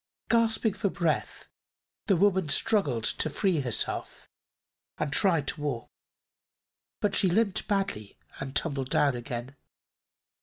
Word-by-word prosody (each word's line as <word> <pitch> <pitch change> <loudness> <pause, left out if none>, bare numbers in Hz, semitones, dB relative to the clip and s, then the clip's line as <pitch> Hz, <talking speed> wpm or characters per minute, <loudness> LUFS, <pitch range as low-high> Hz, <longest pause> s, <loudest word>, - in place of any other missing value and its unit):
Gasping 225 -2 +2
for 200 0 -1
breath 170 -5 -2 0.6
the 200 - +4
woman 190 -3 +2
struggled 145 - +2
to 155 - 0
free 175 +2 +1
herself 125 -5 -2 0.7
and 150 -2 -2
tried 165 -8 +2
to 155 - -5
walk, 140 -6 -3 1.1
but 205 -1 +1
she 190 - +4
limped 200 +1 +1
badly 195 - -2 0.2
and 140 0 -6
tumbled 140 -5 -1
down 140 -3 +2
again. 120 +2 -6
165 Hz, 120 wpm, -28 LUFS, 135-200 Hz, 1.1 s, the